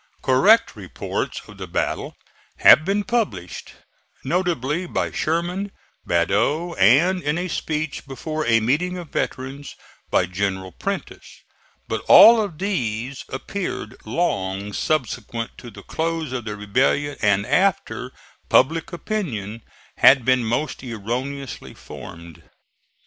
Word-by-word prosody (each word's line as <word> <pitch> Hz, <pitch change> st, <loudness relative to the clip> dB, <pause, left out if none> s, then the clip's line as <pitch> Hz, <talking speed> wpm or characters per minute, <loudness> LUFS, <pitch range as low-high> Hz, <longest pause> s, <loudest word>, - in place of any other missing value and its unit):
Correct 205 Hz, -, +4 dB
reports 95 Hz, -4 st, -4 dB
of 105 Hz, -1 st, -14 dB
the 95 Hz, -, -6 dB
battle 85 Hz, -, -2 dB, 0.4 s
have 155 Hz, -, +8 dB
been 200 Hz, +4 st, 0 dB
published, 215 Hz, -, -3 dB, 0.5 s
notably 170 Hz, 0 st, -1 dB
by -, -, -2 dB
Sherman, 175 Hz, +5 st, -2 dB, 0.4 s
Badeau 115 Hz, -, +1 dB
and, 165 Hz, -, +5 dB
in 150 Hz, +1 st, -1 dB
a 180 Hz, +1 st, -2 dB
speech 155 Hz, -3 st, -3 dB
before 155 Hz, +4 st, -4 dB
a 115 Hz, -1 st, +4 dB
meeting 165 Hz, +11 st, 0 dB
of 175 Hz, -4 st, -8 dB
veterans, 135 Hz, +2 st, -4 dB, 0.3 s
by 90 Hz, -, +3 dB
General 95 Hz, 0 st, -3 dB
Prentiss; 200 Hz, -, -6 dB, 0.5 s
but -, -, -2 dB
all 230 Hz, 0 st, +9 dB
of 195 Hz, -7 st, -4 dB
these 130 Hz, -, -3 dB
appeared 130 Hz, -, -5 dB
long 100 Hz, -, -2 dB
subsequent 120 Hz, -5 st, -2 dB
to 120 Hz, -, -10 dB
the -, -, -13 dB
close 160 Hz, -3 st, -3 dB
of 120 Hz, -3 st, -4 dB
the 105 Hz, -2 st, -4 dB
rebellion 130 Hz, +8 st, 0 dB
and 100 Hz, -1 st, +2 dB
after 185 Hz, -, 0 dB, 0.4 s
public 160 Hz, +7 st, +3 dB
opinion 125 Hz, -, -4 dB, 0.4 s
had 130 Hz, -2 st, +6 dB
been 130 Hz, -1 st, +3 dB
most 120 Hz, +7 st, -2 dB
erroneously 125 Hz, +4 st, -5 dB
formed. 85 Hz, -1 st, -11 dB
135 Hz, 120 wpm, -22 LUFS, 110-170 Hz, 0.5 s, all